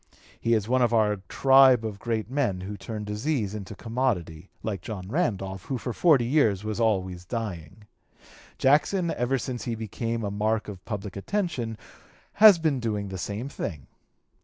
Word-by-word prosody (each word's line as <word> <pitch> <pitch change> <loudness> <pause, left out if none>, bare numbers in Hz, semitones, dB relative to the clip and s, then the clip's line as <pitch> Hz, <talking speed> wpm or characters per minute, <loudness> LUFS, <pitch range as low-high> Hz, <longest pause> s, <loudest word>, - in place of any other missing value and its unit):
He 115 0 +2
is 105 -1 -1
one 130 +1 +2
of 120 -1 +3
our 105 -2 +3
tribe 135 -3 +6
of 105 -2 -5
great 115 -1 -2
men 125 -8 -1
who 100 +3 -6
turn 105 +1 -6
disease 105 0 -2
to 105 - -9
commodity, 100 -9 -2
like 100 -5 -3
John 95 -3 -6
Randolph, 95 - -2
who 135 - -2
for 125 0 -4
forty 145 -7 +4
years 115 -7 +2
was 110 +1 -3
always 95 -6 0
dying. 100 -2 -6 0.7
Jackson, 165 +6 +3
ever 125 +2 0
since 125 -1 -5
he 120 - -2
became 115 +1 -3
a 100 - -2
mark 110 +2 0
of 95 -3 -8
public 105 -3 -5
attention, 125 - -2 0.6
has 215 -4 +10
been 155 -5 0
doing 105 -4 -2
the 95 -1 -6
same 105 +8 -4
thing.... 80 - -5
110 Hz, 165 wpm, -26 LUFS, 100-130 Hz, 0.7 s, has